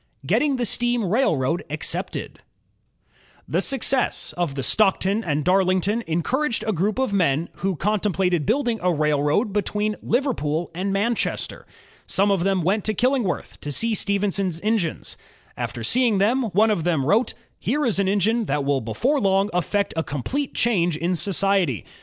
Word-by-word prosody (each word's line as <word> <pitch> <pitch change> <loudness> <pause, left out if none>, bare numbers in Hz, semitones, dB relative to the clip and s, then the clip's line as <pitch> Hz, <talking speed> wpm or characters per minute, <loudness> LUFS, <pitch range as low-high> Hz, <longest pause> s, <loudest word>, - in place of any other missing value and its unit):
Getting 290 -2 +2
the 245 -1 -1
Steam 240 0 0
Railroad 175 - +1
Accepted - - -3 1.1
The - - 0
success 270 -1 +1
of 170 -6 -2
the 135 - -3
Stockton 195 - +2
and 150 -4 -1
Darlington 190 +4 +2
encouraged 235 - 0
a 215 - 0
group 200 +6 0
of 260 -6 0
men 165 -4 +1
who 190 0 -1
contemplated 190 -3 0
building 240 -5 +1
a 180 0 +2
railroad 150 - +1
be 205 - +2
tween 210 +2 -2
Liverpool 175 - -1
and 190 +4 -2
Manchester. 210 +4 -2 0.4
Some 200 +1 +3
of 190 -3 +1
them 195 -2 +1
went 195 +4 +1
to 215 - -1
Killingworth 250 -4 -1
to 145 - -4
see 230 - -1
Stephenson's 200 -4 0
engines. 210 -6 -2 0.4
After 120 - -5
seeing 235 - +2
them, 235 +6 +2
one 215 +2 +3
of 175 -6 -1
the 175 -1 +1
men 135 - -1
wrote: 215 - +2 0.3
''Here 295 0 0
is 210 -4 +1
an 195 - +1
engine 215 +4 +1
that 145 -6 -1
will 140 -1 +1
before 245 - 0
long 195 -1 +2
effect 200 +3 0
a 160 - +1
complete 250 - -3
change 175 -9 +1
in 175 +3 -1
society. 185 - +1
195 Hz, 160 wpm, -23 LUFS, 170-225 Hz, 1.1 s, Some